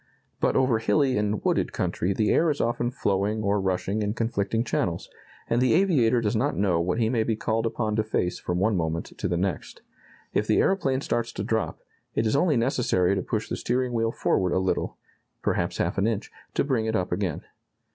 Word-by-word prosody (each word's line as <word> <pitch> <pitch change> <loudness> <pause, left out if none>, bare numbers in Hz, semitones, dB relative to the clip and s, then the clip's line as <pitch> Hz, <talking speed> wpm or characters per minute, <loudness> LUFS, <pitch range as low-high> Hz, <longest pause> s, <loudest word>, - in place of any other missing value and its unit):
But - - +1
over 130 -4 +3
hilly 135 +3 +2
and 105 0 -1
wooded - - +1
country 90 - -1
the 105 +2 +1
air 165 - +3
is 145 - -1
often 120 +1 0
flowing 105 -3 -1
or 100 0 +1
rushing 95 +3 -1
in 105 +1 -1
conflicting 115 -1 0
channels, 90 -7 -1 0.4
and 120 +1 +1
the 125 -2 +4
aviator 135 -11 +3
does 105 0 0
not 135 +7 0
know 95 -4 +2
what 90 +4 -1
he 115 -2 +2
may 115 -1 +1
be 110 0 0
called 110 +1 0
upon 110 -2 -1
to 110 - +2
face 90 -4 -1
from 90 - -2
one 100 +3 +2
moment 80 -1 -2
to - - -2
the 85 - 0
next. 95 +1 -3 0.5
If 105 - +1
the 110 - +3
aeroplane 140 -9 +2
starts 120 -3 -1
to 100 - -4
drop, 110 0 -2 0.3
it 110 - +1
is 110 - +1
only 150 -1 +3
necessary 115 -7 +2
to 95 - 0
push 110 +3 -3
the - - -3
steering 125 0 -1
wheel 115 -1 +1
forward 95 -5 +1
a - - +2
little 95 0 -1 0.5
perhaps - - 0
half - - 0
an 100 - +2
inch 110 -3 -2 0.2
to - - +2
bring 125 -6 0
it 110 - 0
up 90 -4 -1
again. 95 -7 -1
110 Hz, 210 wpm, -26 LUFS, 100-120 Hz, 0.5 s, the